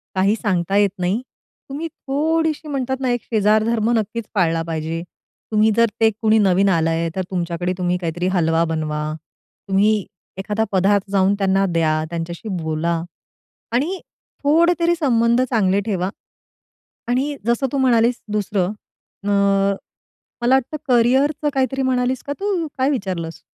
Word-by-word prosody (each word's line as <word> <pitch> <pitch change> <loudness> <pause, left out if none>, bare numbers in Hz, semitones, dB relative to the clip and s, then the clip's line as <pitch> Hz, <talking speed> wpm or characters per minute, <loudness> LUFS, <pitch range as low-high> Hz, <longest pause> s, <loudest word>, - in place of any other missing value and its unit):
काही 195 +3 +3
सांगता 195 -4 -1
येत 205 -1 +4
नाही. 185 +6 0 0.5
तुम्ही 295 +5 -4
थोडीशी 315 +2 -1
म्हणतात 265 -2 -2
ना, 260 -1 -1
एक 245 -1 -1
शेजार 215 -1 +2
धर्म 225 0 +1
नक्कीच 220 +1 -3
पाळला 165 -4 +2
पाहिजे. 165 0 -3 0.5
तुम्ही 215 0 +4
जर, 230 0 +4
ते 225 - +6
कुणी 220 0 +4
नवीन 195 -1 +3
आलंय, 165 -1 +1
तर 190 - 0
तुमच्याकडे 175 0 -2
तुम्ही 180 -1 0
काहीतरी 175 +1 -2
हलवा 165 -1 +2
बनवा, 155 -1 -2 0.6
तुम्ही 200 +2 +3 0.4
एखादा 210 +3 -1
पदार्थ 195 +1 +2
जाऊन 195 0 +3
त्यांना 195 0 +2
द्या, 155 -2 +1
त्यांच्याशी 170 +4 -5
बोला 160 +1 -1 0.7
आणि 315 +10 0 0.4
थोडेतरी 335 +3 +3
संबंध 235 -3 +3
चांगले 200 -5 +2
ठेवा. 190 -3 -1 1.0
आणि 270 +4 0
जसं 235 +3 +2
तू 280 - 0
म्हणालीस 240 -2 +3
दुसरं, 200 -3 0 0.5
अ, 205 - 0 1.1
मला 245 +2 +4
वाटतं 265 +3 0
करियरचं 265 +5 +3
काहीतरी 270 0 0
म्हणालीस 255 -1 0
का 285 - -2
तू? 390 -5 -1
काय 260 +2 +2
विचारलंस? 185 - -3
210 Hz, 140 wpm, -20 LUFS, 180-260 Hz, 1.1 s, ते